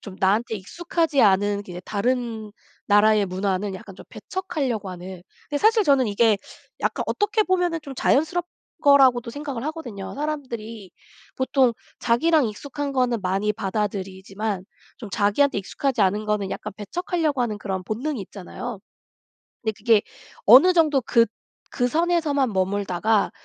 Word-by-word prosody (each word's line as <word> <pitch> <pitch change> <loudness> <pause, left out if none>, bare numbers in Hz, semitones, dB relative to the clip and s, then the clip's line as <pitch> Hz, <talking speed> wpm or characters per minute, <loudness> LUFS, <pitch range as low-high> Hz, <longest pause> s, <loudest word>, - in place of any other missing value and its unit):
좀 195 -3 -10
나한테 210 +4 +1
익숙하지 325 - 0
않은 205 0 +3
그 185 - -13
이제 175 0 -7
다른 225 -1 -2 0.3
나라의 210 0 +5
문화는 190 +1 -2
약간 190 +1 -10
좀 - - -12
배척하려고 275 - -3
하는. 180 0 -9 0.3
근데 290 - -1
사실 435 +5 +4
저는 275 - +3
이게 215 +1 +3 0.4
약간 - - -1
어떻게 415 +1 +1
보면은 355 -4 0
좀 275 -2 -8
자연스럽 320 +7 +1 0.4
거라고도 260 -4 +5
생각을 280 -3 -5
하거든요. 265 - -6
사람들이 235 -9 -5 0.5
보통 260 -2 +2 0.3
자기랑 300 +6 +3
익숙한 285 +6 -5
거는 250 -3 +1
많이 195 +3 0
받아들이지만 195 -1 -3 0.4
좀 225 - -8
자기한테 205 +8 +2
익숙하지 230 +4 -1
않은 205 +3 +1
거는 210 -2 -1
약간 210 - -5
배척하려고 310 - -2
하는 225 -4 -1
그런 190 -2 -4
본능이 240 +7 -3
있잖아요. 200 +4 -7 0.8
근데 220 -1 -1
그게 220 0 +4 0.5
어느 270 - +8
정도 310 -6 +3
그 230 0 +3 0.4
그 245 -2 0
선에서만 315 -3 +1
머물다가 200 +2 +1
230 Hz, 345 characters per minute, -23 LUFS, 200-285 Hz, 0.8 s, 어느